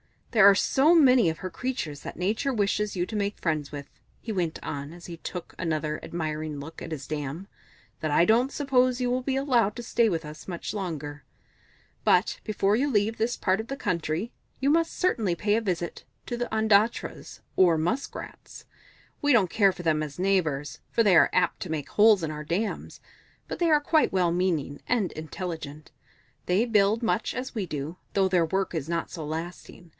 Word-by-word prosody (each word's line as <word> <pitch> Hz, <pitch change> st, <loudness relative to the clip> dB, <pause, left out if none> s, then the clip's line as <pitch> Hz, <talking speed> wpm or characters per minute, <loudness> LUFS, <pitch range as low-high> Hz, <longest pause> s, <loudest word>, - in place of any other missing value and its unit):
"There 210 Hz, -4 st, +8 dB
are 200 Hz, -, +5 dB
so 290 Hz, -, +4 dB
many 255 Hz, -, +6 dB
of 160 Hz, -, -4 dB
her 185 Hz, -, -4 dB
creatures 175 Hz, -, -4 dB
that -, -, -7 dB
Nature 215 Hz, +9 st, -1 dB
wishes 210 Hz, -1 st, 0 dB
you 175 Hz, -1 st, 0 dB
to 220 Hz, -, -7 dB
make 205 Hz, 0 st, -1 dB
friends 155 Hz, -4 st, -1 dB
with," 145 Hz, -1 st, -7 dB, 0.3 s
he 230 Hz, -, -5 dB
went 175 Hz, -6 st, -2 dB
on 140 Hz, +2 st, -5 dB
as 175 Hz, 0 st, -11 dB
he 170 Hz, -1 st, -7 dB
took 175 Hz, +1 st, -7 dB
another 155 Hz, -2 st, -1 dB
admiring 155 Hz, -2 st, -4 dB
look 145 Hz, +3 st, -9 dB
at -, -, -5 dB
his 140 Hz, -3 st, -6 dB
dam, 150 Hz, +5 st, -5 dB, 0.5 s
"that 155 Hz, -, -2 dB
I 150 Hz, -, +5 dB
don't 235 Hz, +8 st, +3 dB
suppose 255 Hz, -3 st, +2 dB
you 245 Hz, -1 st, +1 dB
will 255 Hz, +1 st, 0 dB
be 265 Hz, +1 st, -1 dB
allowed 245 Hz, -7 st, +2 dB
to 240 Hz, -, -6 dB
stay 230 Hz, 0 st, +2 dB
with 170 Hz, -5 st, -1 dB
us 150 Hz, 0 st, -10 dB
much 175 Hz, +1 st, -5 dB
longer. 150 Hz, -8 st, -5 dB, 0.8 s
But 180 Hz, +3 st, +3 dB
before 210 Hz, -1 st, +1 dB
you 285 Hz, +4 st, +1 dB
leave 220 Hz, -2 st, +1 dB
this 230 Hz, +2 st, 0 dB
part 185 Hz, +1 st, +1 dB
of 220 Hz, -, -5 dB
the 275 Hz, -, -4 dB
country, 180 Hz, -, -2 dB, 0.3 s
you 275 Hz, -, +2 dB
must 330 Hz, +2 st, +2 dB
certainly 220 Hz, -, +1 dB
pay 205 Hz, +3 st, +1 dB
a -, -, 0 dB
visit 175 Hz, -5 st, -3 dB, 0.2 s
to 240 Hz, -, -3 dB
the 240 Hz, 0 st, -2 dB
Ondatras, 220 Hz, 0 st, +1 dB, 0.2 s
or 175 Hz, -3 st, +5 dB
Musk 220 Hz, -, -2 dB
Rats. -, -, -10 dB, 0.6 s
We 290 Hz, -1 st, +3 dB
don't 205 Hz, -7 st, +4 dB
care 200 Hz, -1 st, +3 dB
for 175 Hz, -, -9 dB
them 155 Hz, -2 st, +2 dB
as 150 Hz, -2 st, -5 dB
neighbours, 170 Hz, -7 st, 0 dB
for 230 Hz, -, +2 dB
they 200 Hz, -4 st, +5 dB
are -, -, +6 dB
apt 180 Hz, -1 st, +1 dB
to 185 Hz, -, -8 dB
make 155 Hz, -3 st, -3 dB
holes 210 Hz, -3 st, +5 dB
in 155 Hz, -, -2 dB
our 150 Hz, 0 st, -6 dB
dams, 195 Hz, +7 st, -3 dB, 0.5 s
but -, -, -5 dB
they 340 Hz, -1 st, +2 dB
are 300 Hz, -1 st, +5 dB
quite 310 Hz, -4 st, +2 dB
well 180 Hz, -3 st, +2 dB
meaning 170 Hz, -6 st, -1 dB
and 230 Hz, -6 st, +1 dB
intelligent. 155 Hz, -2 st, -7 dB, 0.5 s
They 185 Hz, +5 st, +2 dB
build 215 Hz, 0 st, +2 dB
much 220 Hz, -1 st, 0 dB
as 255 Hz, +1 st, -4 dB
we 215 Hz, -5 st, -2 dB
do, 155 Hz, +1 st, -5 dB, 0.2 s
though 195 Hz, -1 st, +2 dB
their 180 Hz, -3 st, +3 dB
work 190 Hz, +4 st, -1 dB
is 160 Hz, -4 st, -3 dB
not 170 Hz, -1 st, -2 dB
so 160 Hz, -4 st, -6 dB
lasting. 170 Hz, +2 st, -7 dB
185 Hz, 200 wpm, -27 LUFS, 160-225 Hz, 0.8 s, There